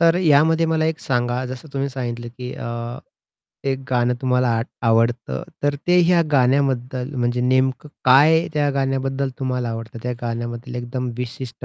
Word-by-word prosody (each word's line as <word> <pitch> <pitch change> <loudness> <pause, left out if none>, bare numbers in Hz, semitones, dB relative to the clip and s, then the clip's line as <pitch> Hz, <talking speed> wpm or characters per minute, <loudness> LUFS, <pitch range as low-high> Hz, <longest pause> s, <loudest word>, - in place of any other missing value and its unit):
तर 165 0 +5
यामध्ये 160 -1 +4
मला 160 -1 +1
एक 160 -1 -1
सांगा, 120 0 0
जसं 130 +4 -8
तुम्ही 140 0 -1
सांगितलं, 120 -3 -5
की 125 +1 -7
अ, 120 +1 -5 0.7
एक 135 -1 0
गाणं 125 -1 +2
तुम्हाला 125 -1 +2
आट 115 - -2 0.2
आवडतं, 115 +5 +1 0.2
तर 145 0 +2
ते 180 0 +5
ह्या 170 0 +4
गाण्याबद्दल 130 0 +1
म्हणजे 120 -1 0
नेमकं 130 +3 +1 0.2
काय 150 +6 +6
त्या 145 -1 +2
गाण्याबद्दल 135 0 -1
तुम्हाला 125 -3 -1
आवडतं? 115 0 -6
त्या 125 - -2
गाण्याबद्दल 120 +1 -4
एकदम 125 +1 -3
विशिष्ट 125 0 -6
130 Hz, 155 wpm, -21 LUFS, 120-140 Hz, 0.7 s, काय